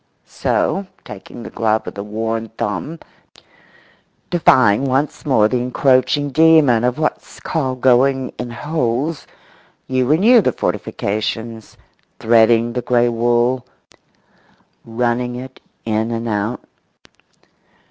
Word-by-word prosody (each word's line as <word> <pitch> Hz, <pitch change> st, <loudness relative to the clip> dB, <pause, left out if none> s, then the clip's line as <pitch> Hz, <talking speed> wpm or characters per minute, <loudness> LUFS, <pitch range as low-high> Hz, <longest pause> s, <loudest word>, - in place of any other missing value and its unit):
So, 195 Hz, 0 st, -1 dB, 0.2 s
taking 105 Hz, +3 st, -10 dB
the -, -, -9 dB
glove 110 Hz, -1 st, 0 dB
with -, -, -7 dB
the 100 Hz, -, -6 dB
worn 110 Hz, +1 st, -4 dB
thumb, 105 Hz, -, -3 dB, 1.3 s
defying 130 Hz, -, +4 dB
once 135 Hz, +4 st, -2 dB
more 110 Hz, -6 st, +4 dB
the 125 Hz, +2 st, -1 dB
encroaching 130 Hz, +3 st, +1 dB
demon 155 Hz, -6 st, +4 dB
of 125 Hz, +2 st, 0 dB
what's 155 Hz, -1 st, -3 dB
called 130 Hz, -6 st, -3 dB
going 130 Hz, +1 st, +3 dB
in 120 Hz, -, -4 dB
holes, 140 Hz, +2 st, -3 dB, 0.6 s
you 130 Hz, -1 st, 0 dB
renew 210 Hz, -, +5 dB
the -, -, 0 dB
fortifications, 110 Hz, +2 st, -4 dB, 0.4 s
threading 115 Hz, +1 st, +3 dB
the 125 Hz, -, -2 dB
grey 120 Hz, 0 st, +2 dB
wool, 120 Hz, +2 st, +1 dB, 1.2 s
running 120 Hz, +1 st, -2 dB
it 130 Hz, +1 st, -9 dB, 0.3 s
in 110 Hz, 0 st, -1 dB
and 115 Hz, 0 st, -3 dB
out. 105 Hz, +2 st, -2 dB
120 Hz, 110 wpm, -18 LUFS, 115-135 Hz, 1.3 s, renew